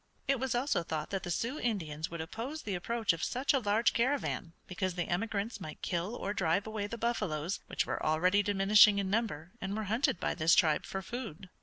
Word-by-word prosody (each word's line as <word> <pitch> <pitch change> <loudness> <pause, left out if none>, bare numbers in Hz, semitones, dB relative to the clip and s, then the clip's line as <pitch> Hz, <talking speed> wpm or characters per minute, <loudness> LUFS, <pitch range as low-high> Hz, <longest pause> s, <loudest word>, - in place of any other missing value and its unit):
It 275 -2 +2
was 260 -1 -1
also 255 -5 +1
thought 155 -2 -4
that 195 -1 -1
the 175 - -6
Sioux 235 - -1
Indians 160 -10 -2
would 170 -1 -5
oppose 240 - -5
the 205 - -3
approach 220 +3 0
of 165 - -5
such 260 +4 +1
a 270 - +3
large 220 +1 +2
caravan 240 - 0
because 185 -1 -3
the 175 - -2
emigrants 210 +3 -2
might 155 -3 -8
kill 180 +5 -2
or 200 -3 -3
drive 190 0 +1
away 215 -2 -3
the 230 - -6
buffaloes, 200 -8 -1
which - - 0
were - - -3
already 180 +6 +3
diminishing 205 +1 +6
in 195 -1 -1
number 190 -7 -1
and 195 +2 -3
were 220 - -2
hunted 230 -6 +1
by - - 0
this 165 -1 +4
tribe 155 -3 +3
for 195 0 -4
food. 200 -6 -7
200 Hz, 210 wpm, -32 LUFS, 175-230 Hz, -, diminishing